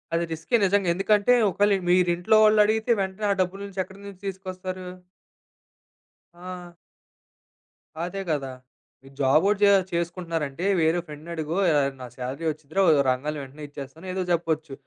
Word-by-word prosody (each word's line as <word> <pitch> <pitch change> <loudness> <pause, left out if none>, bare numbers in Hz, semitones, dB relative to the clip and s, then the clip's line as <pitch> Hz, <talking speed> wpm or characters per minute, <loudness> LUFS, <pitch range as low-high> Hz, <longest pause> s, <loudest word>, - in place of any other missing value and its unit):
అది 170 - +1
రిస్కే 160 +9 -1
నిజంగా. 195 -1 +2
ఎందుకంటే 205 +5 +3 0.2
ఒకేళ 205 +3 +2 0.2
మీరు 180 0 +4
ఇంట్లో 205 +5 +3
వాళ్ళు 215 0 +5
అడిగితే 220 +2 0
వెంటనే 190 +2 -3
ఆ - - +4
డబ్బు 185 +2 -2
నుంచి 200 -1 -7
ఎక్కడి 190 +2 -15
నుంచి 200 -2 -10
తీసుకొస్తారు? 185 -1 -6 1.5
ఆ! 180 0 -9 1.3
అదే 180 +3 -4
గదా! 135 -3 -2 0.5
మీరు 135 0 -16
జాబోటి 160 +10 +3
చే 200 - +7 0.2
చేసుకుంటున్నారంటే 170 -2 -3 0.2
వేరే 160 +2 +2
ఫ్రెండ్‌ని 150 +3 -9
అడుగో 160 +2 -3 0.2
ఆహ్, 140 -1 +1
నా - - -6
సాలరీ 130 +6 -5
వచ్చిదిరా 155 +4 -2
ఒ - - +7 0.2
రంగానే 145 +4 -1
వెంటనే 140 +3 -11
ఇచ్చేస్తాను, 145 +4 -10
ఏదో 185 0 -1
చెప్పొచ్చు. 160 -3 -1
175 Hz, 145 wpm, -25 LUFS, 155-195 Hz, 1.5 s, చే